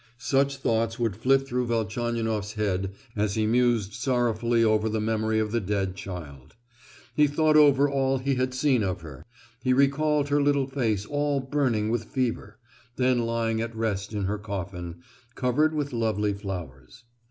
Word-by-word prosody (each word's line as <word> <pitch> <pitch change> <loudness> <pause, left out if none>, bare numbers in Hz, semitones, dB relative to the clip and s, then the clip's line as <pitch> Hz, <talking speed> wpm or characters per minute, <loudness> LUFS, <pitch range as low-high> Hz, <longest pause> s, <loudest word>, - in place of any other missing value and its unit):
Such 135 +3 +1
thoughts 115 -3 0
would 115 -5 -1
flit 135 +5 +2
through 125 -1 -1
Velchaninoff's 115 -2 -1
head 95 -3 -1 0.2
as 105 -2 0
he 110 -1 +1
mused 115 -3 +2
sorrowfully 120 -1 +1
over 110 0 +2
the 110 0 -1
memory 110 0 0
of 110 -1 0
the 115 - +1
dead 95 -1 -1
child. 75 -8 -9 0.6
He 150 0 +4
thought 155 +2 +2
over 145 -2 +6
all 135 -1 +1
he 135 +2 -1
had 130 0 -1
seen 130 -2 +2
of 95 -3 -2
her; 75 -5 -10 0.4
he 130 - +3
recalled 145 +2 +2
her 145 0 +3
little 140 -1 +2
face 115 -7 -1
all 145 +1 0
burning 130 -6 0
with 115 -1 -1
fever, 115 -4 -3 0.4
then 125 -1 +2
lying 115 -1 0
at 115 0 -4
rest 105 -3 -2
in 105 -2 -2
her 100 +2 -2
coffin, 90 -4 -6 0.3
covered 150 +5 +1
with 145 -2 -2
lovely 110 -3 0
flowers. 90 - -8
115 Hz, 165 wpm, -26 LUFS, 105-135 Hz, 0.6 s, over